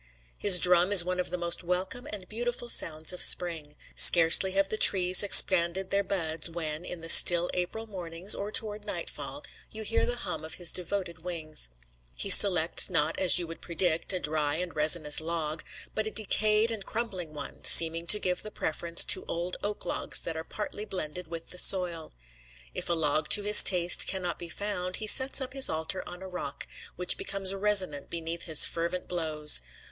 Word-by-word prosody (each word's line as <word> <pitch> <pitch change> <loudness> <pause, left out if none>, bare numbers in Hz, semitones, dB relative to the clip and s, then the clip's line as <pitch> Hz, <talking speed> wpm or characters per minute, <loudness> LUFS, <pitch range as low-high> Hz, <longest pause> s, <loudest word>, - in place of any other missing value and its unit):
His 195 -3 +5
drum 180 +1 +2
is 185 -4 +6
one 180 0 -6
of 180 - -5
the 180 - -7
most 175 0 -2
welcome 185 +9 -6
and 195 -3 -10
beautiful 240 +2 -6
sounds 160 -5 +1
of 180 - -9
spring. 160 -4 +2 0.2
Scarcely 170 +2 +5
have 195 0 -3
the - - -4
trees 185 -3 +5
expanded 185 -2 +4
their 200 0 -2
buds, 165 -4 -5
when, 160 -1 -7
in 180 -2 -10
the 165 - -11
still 175 +1 +5
April 180 +5 -7
mornings, 180 -2 -1
or 205 +1 -7
toward 210 -1 0
nightfall, 205 - -8 0.3
you 220 0 -11
hear 225 +2 -3
the 245 - -4
hum 180 -9 -8
of 160 - -8
his 175 -2 -2
devoted 180 -2 -7
wings. 155 - -2 0.5
He 200 - -4
selects, 180 -3 +6
not, 165 -3 -2
as 185 -1 +4
you 175 - -3
would 165 0 -13
predict, 170 -1 -2
a 185 - -3
dry 150 -1 -4
and 175 -1 -8
resinous 155 0 0
log, 160 -1 -7 0.3
but 215 0 -3
a - - -5
decayed 215 +1 -1
and 220 -3 -8
crumbling 190 -8 -7
one, 150 - -10
seeming 165 +1 +4
to 210 - +5
give 180 -3 -5
the 215 - -8
preference 170 -3 -1
to 185 - +6
old 175 +2 -7
oak 205 0 -6
logs - - -1
that 165 - -8
are 160 - -8
partly 210 +3 -9
blended 180 -4 -8
with 165 0 -11
the 180 - -7
soil. 175 -5 +1 0.6
If - - -7
a - - 0
log 155 -1 -3
to 205 - +5
his 210 +1 +5
taste 180 -2 +2
cannot 180 -3 -4
be 175 - -11
found, 185 -1 -5
he 215 - -6
sets 260 +6 +5
up 255 -1 -8
his 270 -1 +2
altar 160 +4 -3
on 180 +1 -11
a - - -10
rock, 180 -6 -7 0.3
which 180 0 -1
becomes 195 -1 -5
resonant 195 -7 -1
beneath 170 0 -8
his 160 -3 +5
fervent 170 +2 -7
blows. 155 - -1
180 Hz, 190 wpm, -25 LUFS, 165-200 Hz, 0.6 s, is